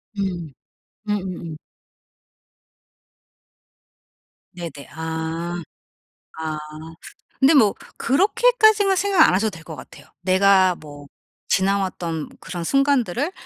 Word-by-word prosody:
음. 180 -6 -3 0.6
음음음. 185 -6 -4 3.0
네네. 165 -5 -8
아. 160 +2 -4 0.8
아. 160 -1 -3 0.8
근데 275 +4 +5
뭐 220 -8 +5 0.2
그렇게까지는 420 - +3
생각 385 -3 +4
안 - - +2
하셔도 210 +3 +1
될 165 -4 -12
것 160 - -8
같아요. - - -13
내가 185 0 +4
뭐 145 -3 -12 0.4
지나왔던 185 -5 -1
그런 175 -1 -6
순간들을 275 - +1
185 Hz, 185 characters per minute, -22 LUFS, 165-265 Hz, 3.0 s, 근데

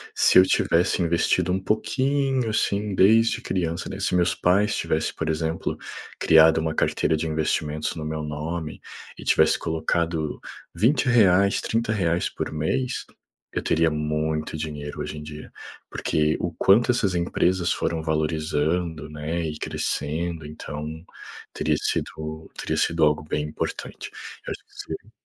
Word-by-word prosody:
se - - +5
eu - - +8
tivesse 90 0 +2
investido 85 +1 +2
um 95 - +1
pouquinho 130 +5 0
assim 105 -1 0
desde 115 +5 +4
criança, 85 -5 -2
né, 95 - -6
se 95 - 0
meus 90 -1 +3
pais 100 +4 +2
tivessem, - - -1
por 80 - -3
exemplo, 80 +1 -1 0.4
criado 80 0 +6
uma 80 0 -1
carteira 80 - +1
de 80 - -2
investimentos 75 -1 -1
no 80 - -4
meu 80 0 -3
nome 75 +1 -4 0.4
e - - -10
tivesse - - +4
colocado 80 -1 -1 0.3
20 130 +4 +2
reais, 100 -4 +5
30 115 0 -1
reais 90 -5 +1
por - - -4
mês, 80 +12 -1 0.5
eu - - -1
teria 80 0 +2
muito 75 +1 -2
dinheiro 75 -1 -5
hoje 75 +1 -5
em - - -6
dia, 75 0 -9 0.4
porque 75 0 0
o 90 -1 -2
quanto 100 +9 +4
essas 105 -6 +2
empresas 90 +1 +1
foram 80 -1 -1
valorizando, 80 +1 -1
né, 75 +3 -3
e 75 -1 -4
crescendo. 80 +2 -2
Então, 75 0 -6 0.7
teria - - +1
sido 80 0 -3
teria - - -2
sido 80 -1 +2
algo 75 -1 +3
bem 75 0 -1
importante. 75 0 -5 0.4
Eu - - -3
acho - - -7
que - - -33
seria - - -8
80 Hz, 145 wpm, -24 LUFS, 75-95 Hz, 0.7 s, eu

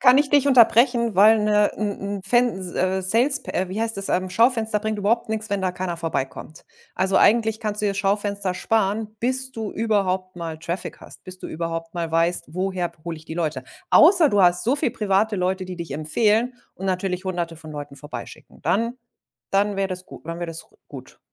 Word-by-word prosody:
Kann 260 +1 +6
ich 290 -1 +2
dich 285 -1 +3
unterbrechen, 235 -2 +4
weil 215 +3 +6
'ne 210 -1 +2
'n 210 -1 -1 0.3
'n - - -7
Fens 195 -4 0
äh, 185 +1 0
salesp 245 +9 +3
äh, 185 0 -1
wie 210 +4 -3
heißt 225 -2 -1
das 195 - -3
ähm, 185 +1 0
Schaufenster 225 +1 +2
bringt 215 0 -3
überhaupt 220 +2 0
nichts, 220 0 -3
wenn 200 -1 -2
da 185 -1 0
keiner 180 -2 -4
vorbeikommt. 155 -1 -5 0.3
Also, 190 0 +1
eigentlich 220 -1 +3
kannst 210 -1 -2
du 210 - 0
dir - - +2
das - - -8
Schaufenster 200 -1 0
sparen, 215 +2 -1
bis 260 +2 +1
du 220 -5 -5
überhaupt 190 -4 -1
mal 165 -2 -6
Traffic 170 +3 -5
hast, - - -13
bis 185 0 -9
du - - -7
überhaupt 165 +1 -5
mal 170 -2 -3
weißt: 165 +2 +1
„Woher 185 -1 -2
hole 170 -1 -4
ich 155 - -14
die 160 - -7
Leute?“ 155 -6 -2 0.2
Außer 335 -1 +6
du 205 -4 +3
hast 175 +2 +4
so 255 +5 +2
viele 285 -4 0
private 210 -1 +1
Leute, 185 +1 -1
die 185 0 -7
dich 170 -1 -6
empfehlen 215 +10 +1 0.2
und 190 - -9
natürlich 185 0 -2
Hunderte 175 -3 -3
von 155 -1 -11
Leuten 145 -1 -8
vorbeischicken. 145 +2 -10
Dann 230 +5 -1 0.5
dann 200 +1 +1
wäre 195 0 0
das 185 0 -6
gut - - -13
dann 165 0 -5
wäre 175 -1 -4
das 165 0 -8
g - - -28
gut. - - -12
195 Hz, 210 wpm, -23 LUFS, 180-220 Hz, 0.5 s, Kann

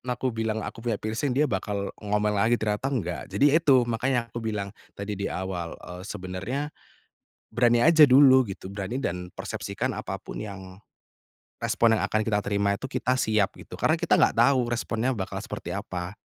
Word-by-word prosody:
aku 130 0 -1
bilang 110 -1 -2
aku - - -7
punya 115 -2 -1
piercing 115 +6 -2
dia 150 +3 +4
bakal 100 -1 -2
ngomel 105 0 0
lagi, 115 +3 +4
ternyata 110 +3 -1
nggak. 100 -11 -2
Jadi 135 +9 +3
itu 145 -6 +5
makanya 120 +1 -1
aku 120 - -4
bilang 105 -3 -3 0.2
tadi 100 +1 -4
di 100 - -1
awal, 90 -2 -4
eee, 90 0 -10
sebenarnya, 105 +10 -4 0.8
berani 120 -1 +4
aja 160 -1 +7
dulu 130 0 +7
gitu, 95 - -7
berani 100 +6 -4
dan 90 -7 -3
persepsikan - - -4
apa - - -5
pun - - -8
yang 95 -2 -9 0.8
respon 115 -1 +3
yang - - -1
akan 110 - 0
kita 105 -2 +1
terima 100 0 +1
itu 100 - -7
kita 130 0 0
siap 110 -5 +1
gitu, - - -11
karena - - +3
kita - - +2
gak - - +4
tahu 130 -3 +4
responnya 120 +1 -1
bakal 95 -3 -4
seperti - - -6
apa, 90 0 -4
110 Hz, 175 wpm, -26 LUFS, 100-125 Hz, 0.8 s, aja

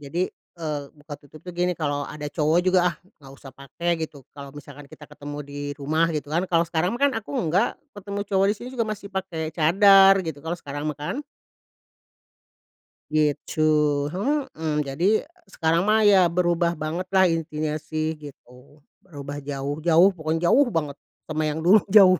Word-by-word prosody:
jadi, 145 +5 -3 0.3
eee, 155 -3 -3
buka 145 0 -10
tutup 145 +2 -16
tuh 180 - -7
gini, 180 +1 0
"Kalau 145 -2 -2
ada 150 -1 -6
cowok 155 +2 +1
juga 185 0 +4
ah - - -23 0.2
nggak 135 -1 -13
usah 135 - -12
pakai," 140 +6 -5
gitu. 150 -4 -7
Kalau 140 -1 -10
misalkan 145 0 -11
kita 150 - -13
ketemu 145 0 -8
di 145 0 -9 0.2
rumah 155 +3 +1
gitu 145 -1 -4
kan, 170 +3 +1
kalau 170 -1 +3
sekarang 170 +4 -1
mah 240 - -7
kan 285 -1 +4
aku 210 - -12
enggak, 170 +4 +1 0.2
ketemu 200 0 -5
cowok 195 0 +2
di - - -5
sini 240 - -9
juga 240 -3 -1
masih 205 -1 -5
pakai 170 -5 -4
cadar 195 +4 +6
gitu, 160 -3 -5
kalau 165 +3 -4
sekarang 145 -2 -7
mah 150 - -4
kan. 150 - -4 2.0
Gitu. 150 0 0 0.5
Mhm. 185 - -2
Jadi 170 +10 +1 0.2
sekarang 170 0 0
mah 215 +1 +4
ya 195 -4 +6
berubah 170 0 +1
banget 160 +4 -4
lah 190 - +6
intinya 155 -2 -2
sih 155 +1 -3
gitu. 140 0 -15 0.2
Berubah 145 -5 -8
jauh 140 0 -4
jauh 170 +3 +6
pokoknya 165 +1 0
jauh 280 +1 +5
banget 155 - -2 0.3
sama 155 0 -2
yang 150 +1 -2
dulu, 195 +5 +7
jauh. 190 -2 +6
160 Hz, 175 wpm, -24 LUFS, 145-185 Hz, 2.0 s, dulu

